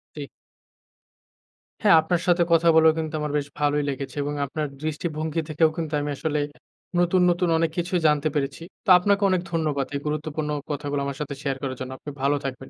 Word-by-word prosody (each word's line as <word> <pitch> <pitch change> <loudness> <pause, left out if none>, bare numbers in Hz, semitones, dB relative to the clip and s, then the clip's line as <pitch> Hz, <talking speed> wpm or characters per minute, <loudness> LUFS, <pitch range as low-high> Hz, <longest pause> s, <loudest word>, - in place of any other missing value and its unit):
ঠিক। 145 -2 -6 1.6
হ্যাঁ, - - +7
আপনার 170 +2 0
সাথে 175 -1 +4
কথা 165 0 +4
বলেও 160 0 +6
কিন্তু 160 -1 -3
আমার 150 -1 -2
বেশ 145 -1 -2
ভালোই 145 0 +2
লেগেছে 135 -1 -5
এবং 145 +1 -3
আপনার 150 +2 -3 0.2
দৃষ্টিভঙ্গি 155 0 -2
থেকেও 155 +1 +3
কিন্তু 160 -2 -3
আমি 145 - -3
আসলে 150 0 -1 0.6
নতুন, 175 +1 +3
নতুন 175 0 +1
অনেক 165 0 +1
কিছু 175 +2 -2
জানতে 150 0 +2
পেরেছি। 140 +1 -2 0.2
তো - - -2
আপনাকে 200 +2 +1
অনেক 185 -2 +2
ধন্যবাদ 155 -5 0
এই - - 0
গুরুত্বপূর্ণ 150 0 -3 0.2
কথাগুলো 145 0 -2
আমার 140 -1 -4
সাথে 145 -1 -3
শেয়ার 135 -2 -2
করার 130 -2 -3
জন্য। 130 0 -5
আপনি 145 - -8
ভালো 140 +2 +2
থাকবেন। 135 0 -5
150 Hz, 185 wpm, -24 LUFS, 145-165 Hz, 1.6 s, হ্যাঁ